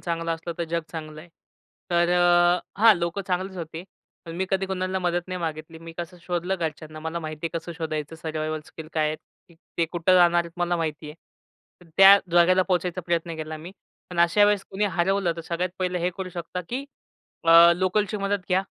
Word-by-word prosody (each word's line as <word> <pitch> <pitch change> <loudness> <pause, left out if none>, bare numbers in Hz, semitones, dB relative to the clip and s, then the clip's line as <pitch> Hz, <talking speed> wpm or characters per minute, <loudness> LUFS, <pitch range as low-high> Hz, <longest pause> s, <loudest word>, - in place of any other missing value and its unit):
चांगलं 165 -1 -2
असलं 165 +1 -6
तर 170 - -1
जग 170 0 0
चांगलंय. 155 0 -8 0.6
तर, 175 0 +3
अ 175 +2 +3
हां, 225 -1 +8
लोकं 170 +3 -2
चांगलेच 185 +1 -2
होते. 165 0 -6 0.4
पण 165 - -8
मी 190 - 0
कधी 195 0 0
कुणाला 185 0 -2
मदत 175 0 -1
नाही 185 0 -3
मागितली. 160 0 -5
मी 165 0 -10
कसं 175 +1 -6
शोधलं 180 +1 -2
घरच्यांना. 155 -2 -5
मला 160 +2 -4
माहिती 155 0 -5
आहे 165 0 -3
कसं 165 +1 -8
शोधायचं, 155 -1 -4
सर्वाइवल 155 -1 -3
स्किल 160 -1 -10
काय 155 -1 +1
आहेत? 155 +4 -8 0.3
ते 170 - +4
कुठं 175 +2 +3
जाणार 175 -1 +5
आहेत? 170 - -11
मला 175 0 0
माहिती 155 -2 -3
आहे. - - -11 0.7
तर, 175 - -18
त्या 195 +1 +9
जागेला 180 +2 +5
पोहोचायचा 180 -1 -1
प्रयत्न 170 -1 -1
केला 155 0 -5
मी. 170 +4 -10 0.4
पण 175 -1 -1
अशा 170 +5 +5
वेळेस 205 -1 +2
कुणी 195 +2 -1
हरवलं 190 -1 +1
तर - - -5
सगळ्यात 170 +2 -3
पहिलं 180 -1 -1
हे 175 +1 0
करू 190 -1 -4
शकता 175 +1 -5
की, 260 +3 -3 0.6
अ, 165 +1 +8
लोकलची 195 +3 0
मदत 200 0 -1
घ्या. 185 +1 +2
175 Hz, 195 wpm, -25 LUFS, 165-185 Hz, 0.7 s, त्या